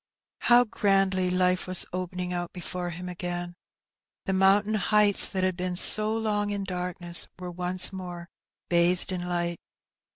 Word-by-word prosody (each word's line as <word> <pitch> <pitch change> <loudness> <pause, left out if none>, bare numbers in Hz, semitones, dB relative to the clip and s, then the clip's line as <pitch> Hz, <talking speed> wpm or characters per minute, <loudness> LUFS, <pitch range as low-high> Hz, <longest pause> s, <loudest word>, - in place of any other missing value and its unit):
How 240 0 +4
grandly 195 -4 0
life 180 0 0
was 185 -1 +3
opening 180 0 -5
out 175 -1 -5
before 180 0 -6
him 180 +1 -8
again 175 0 -6
1 - - -24 0.7
The 190 - -2
mountain 195 +3 +2
heights 210 0 +3
that 190 -1 -3
had 185 -1 -1
been 180 0 -4
so 215 +4 +7
long 210 -2 -2
in 200 -1 -4
darkness 180 -2 -1
were 180 -1 -8
once 180 +2 +2
more 175 -2 -9 0.4
bathed 175 +1 0
in 180 -1 -5
light. 175 -1 -3
180 Hz, 155 wpm, -25 LUFS, 175-195 Hz, 0.7 s, so